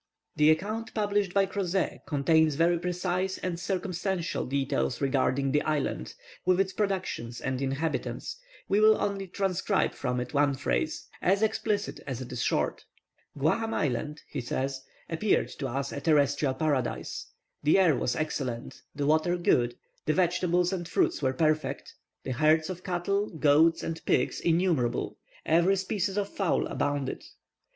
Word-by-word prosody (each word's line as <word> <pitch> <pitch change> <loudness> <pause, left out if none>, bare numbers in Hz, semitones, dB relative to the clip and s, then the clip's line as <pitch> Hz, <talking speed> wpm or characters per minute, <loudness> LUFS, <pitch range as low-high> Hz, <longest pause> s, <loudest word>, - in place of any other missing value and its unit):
The 150 0 +5
account 210 +8 0
published 205 -3 +1
by 195 +1 +3
Crozet 190 -2 -2
contains 155 +1 +3
very 170 +2 +3
precise 180 +2 -1
and 175 -2 -3
circumstantial 185 -1 -2
details 130 - 0
regarding 135 0 +1
this 150 +1 +3
island, 145 - -2 0.3
with 185 0 +3
its 195 -1 +1
productions 185 - -2
and 130 0 -2
inhabitants. 140 - -2 0.3
We 200 - +3
will 215 0 +6
only 195 -1 -2
transcribe 195 +1 0
from 125 -1 -2
it 125 +3 -5
one 145 -1 +3
phrase, 315 - -1
as 195 +4 +2
explicit 215 -1 0
as 130 -3 -3
it 130 - -7
is 125 -2 -3
short. - - 0 0.5
"Guaham 225 +11 +1
Island," 150 +2 -2
he 140 - -4
says, 130 +2 -2 0.3
"appeared 185 +6 +1
to 135 - -2
us 135 +2 -3
a 140 - -5
terrestrial 145 -3 +2
paradise. 145 -2 -1 0.3
The 150 +5 +4
air 180 -6 +5
was 125 - -1
excellent, 130 -6 -3
the 145 -1 -1
water 155 +4 +2
good, 120 -8 +2 0.3
the 155 - +3
vegetables 180 0 +2
and 175 -3 -3
fruits 165 - +1
were 130 -2 +2
perfect, 155 -2 0 0.3
the 130 - -4
herds 155 +6 +3
of 180 0 -8
cattle, 195 +3 -1
goats, 160 +1 +3
and 165 0 -4
pigs, - - +2
innumerable; 165 -7 +1 0.3
every 170 +4 +4
species 195 +1 -1
of 205 -1 0
fowl 195 -3 0
abounded." 145 -2 -2
165 Hz, 150 wpm, -28 LUFS, 140-190 Hz, 0.5 s, will